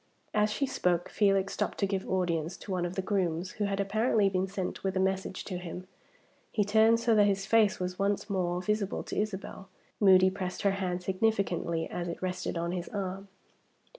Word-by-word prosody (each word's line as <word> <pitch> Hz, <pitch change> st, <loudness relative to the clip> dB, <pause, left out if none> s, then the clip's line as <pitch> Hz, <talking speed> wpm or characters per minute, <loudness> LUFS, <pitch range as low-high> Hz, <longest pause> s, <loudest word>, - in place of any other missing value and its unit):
As 210 Hz, 0 st, +3 dB
she 275 Hz, -, 0 dB
spoke, 175 Hz, -9 st, 0 dB
Felix 195 Hz, -2 st, +2 dB
stopped -, -, -2 dB
to 200 Hz, -, +1 dB
give 195 Hz, -1 st, -2 dB
audience 175 Hz, -2 st, -1 dB
to 200 Hz, -, -9 dB
one 180 Hz, -2 st, 0 dB
of 175 Hz, -, -7 dB
the 190 Hz, -, -1 dB
grooms, 185 Hz, -3 st, -1 dB
who 210 Hz, -, -2 dB
had 200 Hz, 0 st, -1 dB
apparently 210 Hz, +1 st, +2 dB
been 190 Hz, 0 st, 0 dB
sent 190 Hz, -1 st, -4 dB
with 190 Hz, -1 st, -1 dB
a -, -, +2 dB
message 190 Hz, 0 st, -1 dB
to 185 Hz, -3 st, -5 dB
him. 180 Hz, +1 st, -7 dB, 0.7 s
He 210 Hz, -, +2 dB
turned 220 Hz, +3 st, +4 dB
so 230 Hz, 0 st, +2 dB
that 205 Hz, -1 st, +5 dB
his 195 Hz, -1 st, 0 dB
face 220 Hz, -1 st, +3 dB
was 180 Hz, 0 st, -3 dB
once 200 Hz, +1 st, 0 dB
more 180 Hz, -3 st, -1 dB
visible 210 Hz, 0 st, -1 dB
to -, -, -6 dB
Isabel. 195 Hz, -2 st, -5 dB, 0.3 s
Moody 190 Hz, -2 st, +6 dB
pressed 185 Hz, -2 st, -4 dB
her 200 Hz, -, +4 dB
hand 185 Hz, -2 st, -2 dB
significantly 185 Hz, -4 st, 0 dB
as 175 Hz, 0 st, -4 dB
it 170 Hz, -, -5 dB
rested 185 Hz, -1 st, -3 dB
on 170 Hz, +1 st, -1 dB
his 175 Hz, -1 st, -4 dB
arm. 195 Hz, -1 st, -4 dB
190 Hz, 195 wpm, -30 LUFS, 180-205 Hz, 0.7 s, Moody